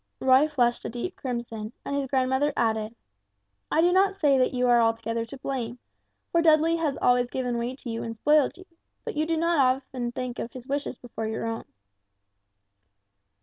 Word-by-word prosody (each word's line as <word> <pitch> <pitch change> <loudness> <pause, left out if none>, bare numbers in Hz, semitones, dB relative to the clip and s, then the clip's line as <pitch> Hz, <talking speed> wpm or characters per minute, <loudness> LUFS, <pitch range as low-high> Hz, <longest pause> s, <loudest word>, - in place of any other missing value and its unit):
Roy 260 +3 +5
flushed 245 -5 +1
a - - -4
deep 245 +10 -5
crimson, 235 -4 -5
and 280 - -2
his 280 -1 -1
grandmother 265 +2 +1
added, 220 0 0 0.7
"I 320 - +3
do 350 +1 +4
not 390 +1 +3
say 295 -8 +3
that 255 - +3
you 250 -1 +1
are 240 -1 +5
altogether 230 0 0
to 250 +4 -10
blame, 250 -3 -4 0.5
for 335 - +3
Dudley 325 +1 +4
has 305 -5 -1
always 245 0 +3
given 245 -2 -2
way 240 +2 -3
to 265 - -11
you 230 -1 -3
and 225 0 -5
spoiled 295 +7 +3
you; 370 - -13 0.4
but 465 - -3
you 310 +1 0
do 330 0 0
not 335 +1 +1
very 255 -1 +5
often 255 -3 -5
think 250 0 -5
of 230 - -5
his 255 -1 -10
wishes 280 -2 -3
before 225 -2 -6
your 220 +1 -3
own." 225 0 -4
255 Hz, 190 wpm, -26 LUFS, 235-295 Hz, 0.7 s, Roy